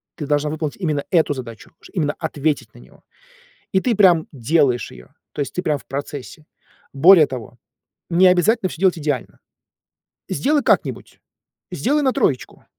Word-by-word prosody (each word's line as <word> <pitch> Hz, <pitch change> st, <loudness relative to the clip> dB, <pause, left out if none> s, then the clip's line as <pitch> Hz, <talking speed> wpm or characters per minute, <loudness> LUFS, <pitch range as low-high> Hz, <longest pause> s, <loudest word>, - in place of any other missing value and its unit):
Ты 155 Hz, -, -6 dB
должна 150 Hz, 0 st, 0 dB
выполнить 155 Hz, -1 st, -4 dB
именно 155 Hz, -7 st, -2 dB
эту 160 Hz, -5 st, +2 dB
задачу, 115 Hz, -4 st, -9 dB
ш -, -, -16 dB
именно 150 Hz, -5 st, -1 dB
ответить 155 Hz, -2 st, -2 dB
на -, -, -15 dB
него. -, -, -19 dB, 0.7 s
И 190 Hz, -, +3 dB
ты 240 Hz, -4 st, 0 dB
прям 175 Hz, -6 st, +4 dB
делаешь 135 Hz, -1 st, +1 dB
ее. 60 Hz, -, -15 dB, 0.2 s
То -, -, -4 dB
есть 140 Hz, -, -4 dB
ты 180 Hz, -, -2 dB
прям 150 Hz, -4 st, 0 dB
в -, -, -17 dB
процессе. 145 Hz, +2 st, -7 dB, 0.5 s
Более 160 Hz, +2 st, +7 dB
того, 125 Hz, -2 st, -8 dB, 0.5 s
необязательно 185 Hz, +4 st, +3 dB
всё -, -, -10 dB
делать 180 Hz, -3 st, +2 dB
идеально. 145 Hz, -4 st, -3 dB, 0.9 s
Сделай 290 Hz, -, +1 dB
как-нибудь. -, -, -1 dB, 0.5 s
Сделай 295 Hz, +4 st, 0 dB
на 260 Hz, -2 st, +2 dB
3. 145 Hz, -, -2 dB
155 Hz, 155 wpm, -20 LUFS, 140-185 Hz, 0.9 s, Более